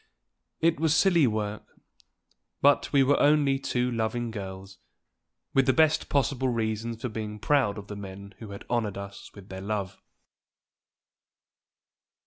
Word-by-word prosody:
It 165 -2 +2
was 160 -1 +2
silly 170 -6 +4
work; 105 -1 -4 0.8
but 145 0 +3
we 140 -2 +5
were 140 +2 +3
only 145 -2 +4
two 125 -2 -1
loving 115 +1 -2
girls, 95 -2 -8 0.7
with 135 0 +3
the 130 - +5
best 160 -1 +3
possible 135 -1 +1
reasons 115 -1 -2
for - - 0
being 105 -1 -5
proud 130 -3 +1
of 100 - -7
the 105 - -7
men 100 0 -9
who 110 - -9
had 100 0 -9
honored 110 -5 -1
us 100 0 -8
with 100 -1 -13
their 95 0 -7
love. 100 -2 -4
115 Hz, 140 wpm, -27 LUFS, 100-135 Hz, 0.8 s, we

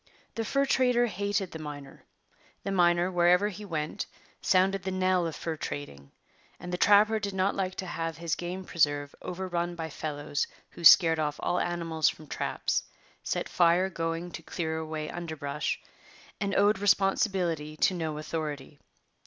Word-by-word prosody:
The 225 - -2
fur 275 +5 +1
trader 250 -2 +3
hated 200 -2 -2
the 160 - -7
miner. 145 -2 -9 0.6
The 195 - -2
miner, 175 -1 +3
wherever 180 +3 +4
he 210 +1 -8
went, 155 -5 -3 0.3
sounded 190 +1 +3
the 190 - -3
knell 185 -2 +1
of 160 - -5
fur 160 0 -4
trading; 70 - -6 0.5
and 180 +1 -7
the - - 0
trapper 210 +2 +5
did 200 -2 -4
not 190 +1 +2
like 185 -1 -2
to 190 - -4
have 165 -2 -4
his 165 -2 -2
game 180 +2 -4
preserve 145 -4 +1
overrun 175 -1 -3
by 160 -2 -5
fellows 145 -1 -3 0.2
who 170 - -11
scared 165 0 +8
off 150 -1 -1
all 180 - +1
animals 165 -2 +1
from 155 - -9
traps, 145 - -1 0.4
set - - -2
fire 175 +2 +3
going 165 +1 -3
to 165 - -7
clear 160 0 -3
away 155 -1 -4
underbrush, 155 -4 -3 0.6
and 200 -1 -1
owned 205 0 +4
responsibility 195 -6 +1
to 185 - +3
no 160 -4 -3
authority. 150 -2 -5
175 Hz, 160 wpm, -29 LUFS, 155-190 Hz, 0.6 s, scared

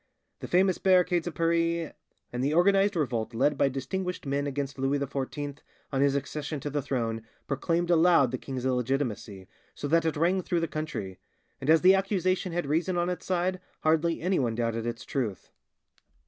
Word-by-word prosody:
The - - -6
famous 185 +1 +3
barricades 180 -2 +3
of 175 - -5
Paris, 165 0 +1 0.4
and 125 +1 -2
the 145 +3 +1
organised 195 +3 +4
revolt 120 -7 -1
led 145 +5 +2
by 140 - +2
distinguished 180 +8 -4
men 140 +1 -1
against 140 -1 -4
Louis 135 +2 +1
XIV 140 +1 -4 0.3
on 135 -1 0
his 140 0 +3
accession 145 +2 -3
to 145 - -4
the 145 0 -1
throne, 115 -4 -2 0.2
proclaimed 165 +5 0
aloud 165 -6 +5
the 130 - -3
king's 130 -2 -5
illegitimacy, 125 -6 -2 0.3
so 145 - -4
that 165 +2 +4
it 160 -2 0
rang 180 +4 +2
through 175 -1 -1
the 165 - 0
country; 125 -12 -5 0.4
and 135 - -4
as 160 0 +6
the 185 +1 +7
accusation 190 -2 0
had 175 -1 -1
reason 165 +5 0
on 175 +1 +1
its 180 - -6
side, 185 0 0 0.2
hardly 160 +1 +2
anyone 150 -11 +1
doubted 115 0 -1
its 120 -1 -5
truth." 110 -9 -3
150 Hz, 175 wpm, -28 LUFS, 135-175 Hz, 0.4 s, the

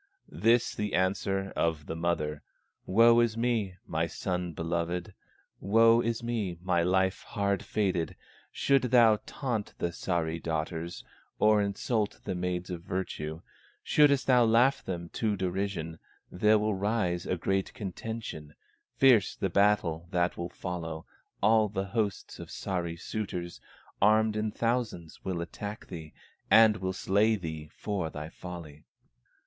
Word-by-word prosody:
This 115 +2 +2
the 105 -1 -2
answer 95 +1 0
of 80 -3 0
the 80 - -5
mother: 80 -3 -1 0.5
"Woe 115 +4 +6
is 115 -1 +2
me, 115 -6 0
my 80 +1 -1
son 90 0 -3
beloved! 85 +3 -3 0.5
Woe 115 +3 +5
is 115 0 -2
me, 110 -7 -2
my 90 -2 +2
life 95 +2 +1
hard 100 -3 -1
fated! 95 -6 -1 0.4
Shouldst 135 -2 +2
thou 115 -3 +6
taunt 120 -7 -3
the 85 - -1
Sahri 85 -2 -2
daughters, 80 +1 -3 0.3
Or 105 -1 +4
insult 105 +2 -1
the 95 - -3
maids 90 0 -3
of 85 -2 -5
virtue, 80 -3 -4 0.4
Shouldst 140 -3 +4
thou 125 -2 +5
laugh 120 +5 +4
them 85 -2 -5
to 110 +1 -1
derision, 95 -3 -3 0.3
There 105 +4 +4
will 105 0 0
rise 95 -3 -1
a 90 - 0
great 95 +3 -1
contention, 100 -6 -6 0.4
Fierce 125 -7 +5
the 95 - -2
battle 90 -4 +2
that 90 -1 +1
will 85 +1 -4
follow. 80 -3 -5 0.4
All 110 0 +4
the 95 -1 -2
hosts 105 -1 -3
of - - -8
Sahri 85 -3 -3
suitors, 90 -4 -5 0.4
Armed 110 +1 +4
in 110 0 0
thousands 115 -8 -2
will 90 -3 -2
attack 100 +5 -6
thee, 80 -4 -8 0.4
And 110 -1 +7
will 95 -2 -2
slay 105 +4 +2
thee 80 -5 -6
for 95 -6 -3
thy 75 0 -7
folly." 85 -4 -9
95 Hz, 140 wpm, -29 LUFS, 85-110 Hz, 0.5 s, And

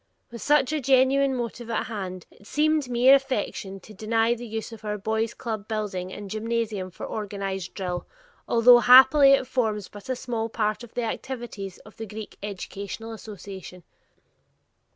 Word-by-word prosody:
With 235 -2 -8
such 295 -1 +3
a 305 - 0
genuine 265 +1 +3
motive 240 -1 -5
at 230 - -1
hand, 185 -5 -6
it 200 - -19
seemed 305 -1 +1
mere 245 +2 +6
affectation 235 -7 -1
to 215 - -13
deny 225 +3 +1
the 240 0 -7
use 220 +1 -5
of 225 -1 -11
our 210 -1 -2
boys' 220 +2 -1
club 220 -4 -5
building 200 -4 -3
and 205 +1 -7
gymnasium 215 -2 -2
for 180 - -8
organized 195 -3 -4
drill, 180 -2 -4 0.4
although 240 +1 +7
happily 265 +4 +8
it 270 - +3
forms 220 -6 -1
but 205 +3 -12
a 255 - 0
small 230 -3 -3
part 215 0 -1
of 235 - -13
the 245 - -1
activities 230 -5 -5
of 215 - -15
the 225 - -6
Greek 215 +1 -8
Educational 200 +2 -6
Association. 195 -4 -9
225 Hz, 165 wpm, -25 LUFS, 205-245 Hz, 0.4 s, happily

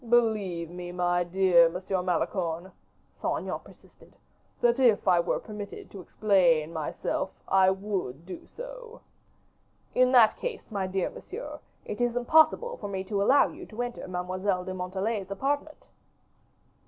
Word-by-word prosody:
"Believe 205 -8 +2
me, 175 0 -7
my 175 0 +1
dear 175 -1 +5
Monsieur 185 +2 -2
Malicorne," 175 0 -1 0.5
Saint - - 0
Aignan - - -4
persisted, - - -19 0.4
"that 240 +1 +3
if 235 -6 +4
I 180 -2 +5
were 170 - +1
permitted 210 -2 -8
to 195 - -8
explain 170 -5 +2
myself, 155 -2 -2 0.2
I 190 -1 +5
would 190 -7 -3
do 185 - -9
so." - - -10 0.9
"In 255 0 +4
that 235 -4 +6
case, 480 - -5
my 195 -3 -1
dear 185 -1 -1
monsieur, 445 +6 -8 0.3
it 210 - -5
is 240 -1 +1
impossible 315 - +3
for - - -6
me 190 -1 -3
to 200 +1 -2
allow 270 +8 +5
you 360 +3 -10
to 225 +2 -5
enter 245 -4 -6
Mademoiselle 185 +1 -2
de 185 - -4
Montalais's 190 +2 -3
apartment." 285 +9 -3
195 Hz, 145 wpm, -28 LUFS, 180-240 Hz, 0.9 s, that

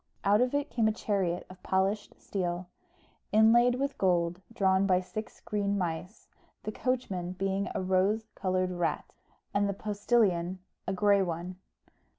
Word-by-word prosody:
Out 205 +3 +4
of 250 +2 +1
it 285 0 -1
came 225 -3 +2
a - - +3
chariot 195 -5 -1
of 185 0 -13
polished 195 +2 -1
steel, 175 -2 -3 0.6
inlaid 235 +3 +6
with 275 +2 -2
gold, 175 -1 +1
drawn 190 -3 +2
by 185 -2 +4
six 215 +4 -7
green 205 -1 -1
mice, 180 +2 -4 0.4
the 215 - -3
coachman 200 -8 -2
being 195 +1 -1
a - - -1
rose 190 +4 +2
coloured 185 -1 0
rat, 175 -4 -2 0.4
and 200 0 +2
the - - 0
postilion 200 -4 +1 0.3
a - - 0
grey 200 +1 +4
one. 175 0 -3
195 Hz, 150 wpm, -30 LUFS, 180-215 Hz, 0.6 s, inlaid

